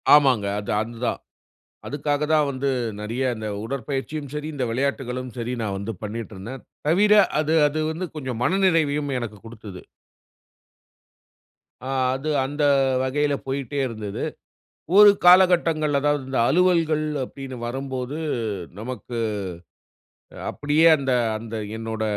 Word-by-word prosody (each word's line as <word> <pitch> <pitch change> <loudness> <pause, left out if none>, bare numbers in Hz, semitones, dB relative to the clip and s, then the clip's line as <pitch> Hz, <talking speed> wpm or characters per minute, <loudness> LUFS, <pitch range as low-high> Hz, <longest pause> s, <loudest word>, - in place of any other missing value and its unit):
ஆமாங்க, 130 -8 +4
அது-அதுதான். 110 +4 -2 0.7
அதுக்காகதான் 150 +1 +1
வந்து, 140 +1 -2 0.3
நிறையா 120 +5 -2
இந்த 110 0 -5 0.2
உடற்பயிற்சியும் 140 +3 -4
சரி, 150 0 -4
இந்த 135 -3 -1
விளையாட்டுகளும் 130 0 -2
சரி 120 +1 -2
நான் 100 -3 -2
வந்து 100 +3 -4
பண்ணிட்ருந்தேன். 110 +2 -6 0.3
தவிர 205 +6 +4 0.3
அது-அது 155 -1 +2
வந்து 170 +4 -3
கொஞ்சம் 130 -5 -4
மனநிறைவையும் 160 -6 +2
எனக்குக் 110 -4 -7
குடுத்தது. 105 -5 -10 2.0
ஆ, - - -4 0.3
அது 135 +4 -4 0.2
அந்த 145 +2 -2 0.4
வகையில 145 +2 +1
போயிட்டே 135 +1 -3
இருந்தது. 110 -4 -5 0.8
ஒரு 210 0 +10
காலகட்டங்கள், 175 -4 +5
அதாவது 145 0 +1
இந்த 135 - -1
அலுவலகங்கள் 165 -1 +3 0.2
அப்டின்னு 135 0 -8
வரும்போது, 130 +2 -4 0.6
நமக்கு 120 0 -5 1.2
அ, - - -10
அப்டியே 150 +3 +3
அந்த 135 -2 -2 0.3
-அந்த 115 +1 -7 0.2
என்னோட 110 -1 -4
135 Hz, 110 wpm, -23 LUFS, 115-150 Hz, 2.0 s, ஒரு